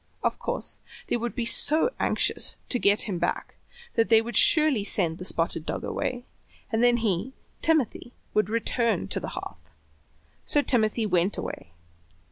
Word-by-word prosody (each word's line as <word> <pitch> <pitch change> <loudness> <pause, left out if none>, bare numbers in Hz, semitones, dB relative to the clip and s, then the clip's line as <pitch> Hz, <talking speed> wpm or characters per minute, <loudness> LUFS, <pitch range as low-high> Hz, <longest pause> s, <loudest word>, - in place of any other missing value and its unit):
Of - - -1
course - - -3 0.3
they - - +1
would 240 0 -4
be 240 -3 -2
so 310 - +3
anxious - - +1
to 245 - +2
get 200 -1 +4
him 185 -4 -4
back 175 - -3 0.4
they 225 -1 +4
would 235 +2 -5
surely 305 -9 +5
send 175 -5 0
the 180 - -4
spotted 165 -2 0
dog - - -4
away, 245 0 -3 0.5
and 225 +1 +1
then 245 0 +4
he, 205 +6 -1 0.3
Timothy, 295 -6 +1 0.2
would 215 -1 +1
return 230 +1 0
to - - -1
the - - -6
hearth. - - -9 0.7
So 290 - +1
Timothy 225 -3 +1
went 185 0 +1
away. 80 - -7
225 Hz, 155 wpm, -26 LUFS, 200-245 Hz, 0.7 s, surely